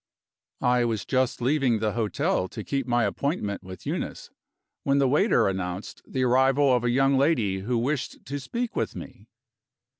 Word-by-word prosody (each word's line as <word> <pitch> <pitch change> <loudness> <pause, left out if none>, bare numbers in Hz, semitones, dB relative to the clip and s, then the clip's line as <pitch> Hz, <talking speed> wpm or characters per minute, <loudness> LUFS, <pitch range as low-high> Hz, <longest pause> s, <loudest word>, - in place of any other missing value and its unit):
I 125 0 +4
was 115 -4 -1
just 130 -2 0
leaving 130 -3 +2
the 110 0 0
hotel 105 -4 0
to 110 +3 -7
keep 135 +1 -2
my 120 -1 +2
appointment 140 - -2
with 95 -1 -11
Eunice, - - -4 0.5
when 140 0 +1
the 140 -1 +4
waiter 150 - +3
announced 95 0 -4
the 130 - -1
arrival 130 +2 +4
of 120 - 0
a 120 - +1
young 135 +2 +3
lady 115 -10 +2
who 120 +5 -1
wished 135 +3 -2
to 140 +2 -4
speak 235 - -4
with - - -2
me. - - -10
125 Hz, 170 wpm, -26 LUFS, 110-140 Hz, 0.5 s, I